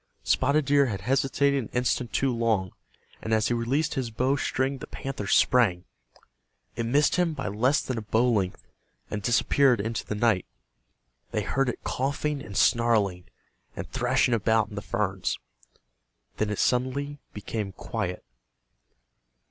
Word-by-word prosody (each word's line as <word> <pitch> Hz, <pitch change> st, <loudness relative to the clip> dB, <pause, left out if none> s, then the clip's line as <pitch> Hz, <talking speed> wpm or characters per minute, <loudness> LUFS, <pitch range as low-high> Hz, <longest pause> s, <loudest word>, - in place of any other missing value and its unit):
Spotted 140 Hz, +3 st, +2 dB
Deer 140 Hz, 0 st, +4 dB
had 100 Hz, -5 st, -4 dB
hesitated 135 Hz, +4 st, +1 dB
an -, -, -10 dB
instant 125 Hz, -1 st, 0 dB
too 135 Hz, -3 st, +1 dB
long, 110 Hz, -6 st, 0 dB, 0.5 s
and 110 Hz, -, -5 dB
as 110 Hz, -, +1 dB
he -, -, +1 dB
released 135 Hz, +7 st, 0 dB
his 130 Hz, -5 st, -2 dB
bow 130 Hz, +5 st, +1 dB
string 135 Hz, -1 st, -1 dB
the 150 Hz, -, -8 dB
panther 135 Hz, -7 st, -5 dB
sprang. 95 Hz, -7 st, +3 dB, 0.9 s
It 115 Hz, 0 st, -2 dB
missed 145 Hz, +6 st, +3 dB
him 170 Hz, -3 st, +1 dB
by 135 Hz, -, -4 dB
less 125 Hz, +8 st, +2 dB
than 130 Hz, -3 st, -3 dB
a -, -, -6 dB
bow 110 Hz, +3 st, +1 dB
length, 100 Hz, -6 st, 0 dB, 0.5 s
and 105 Hz, -, -3 dB
disappeared 120 Hz, +2 st, +3 dB
into 110 Hz, +1 st, -2 dB
the 105 Hz, -, -4 dB
night. 105 Hz, -4 st, +1 dB, 0.8 s
They -, -, -1 dB
heard 135 Hz, -1 st, 0 dB
it -, -, -6 dB
coughing 140 Hz, +2 st, -2 dB
and 100 Hz, -5 st, -7 dB
snarling, 105 Hz, -6 st, +2 dB, 0.5 s
and -, -, -5 dB
thrashing 125 Hz, -, +2 dB
about 110 Hz, -1 st, +2 dB
in 105 Hz, -, -9 dB
the 100 Hz, -, -4 dB
ferns. 95 Hz, -3 st, -2 dB, 1.0 s
Then 110 Hz, -, 0 dB
it 105 Hz, -, -2 dB
suddenly 140 Hz, +3 st, 0 dB
became 105 Hz, -1 st, -4 dB
quiet. 95 Hz, -1 st, -4 dB
120 Hz, 150 wpm, -27 LUFS, 105-135 Hz, 1.0 s, Deer